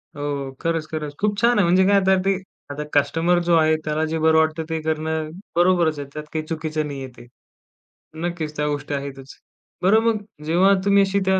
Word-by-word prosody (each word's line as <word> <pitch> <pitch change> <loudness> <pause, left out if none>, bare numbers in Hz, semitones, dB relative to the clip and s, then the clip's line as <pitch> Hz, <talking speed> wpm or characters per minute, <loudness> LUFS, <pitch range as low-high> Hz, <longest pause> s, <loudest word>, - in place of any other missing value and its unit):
हो. 145 -2 -3
खरंच, 165 -1 -1
खरंच, 150 -2 -4
खूप 205 0 0
छान 240 +1 +4
आहे. - - +5
म्हणजे 180 +2 +4
काय 200 - +4
आता 190 0 +3
ते 195 0 +3 0.4
आता 145 +1 -4
कस्टमर 165 +4 +2
जो 170 0 +3
आहे, 155 -1 +4
त्याला 155 +1 -1
जे 160 +1 -2
बरं 160 0 +4
वाटतं 160 0 +1
ते 160 0 -1
करणं 155 0 -2 0.3
बरोबरच 175 -3 +3
आहे, 140 - -6
त्यात 150 - -6
काही 155 -1 -2
चुकीचं 155 -1 -3
नाही 140 -2 -6
आहे 130 - -7
ते. - - -12 1.0
नक्कीच 165 -3 -4
त्या 150 0 0
गोष्टी 145 0 -3
आहेतच. 140 -1 -6 0.5
बरं 200 +4 +5
मग 230 -1 +2 0.3
जेव्हा 180 +5 +4
तुम्ही 200 0 +5
अशी 195 +1 0
त्या 190 0 +3
160 Hz, 200 wpm, -22 LUFS, 150-180 Hz, 1.0 s, आहे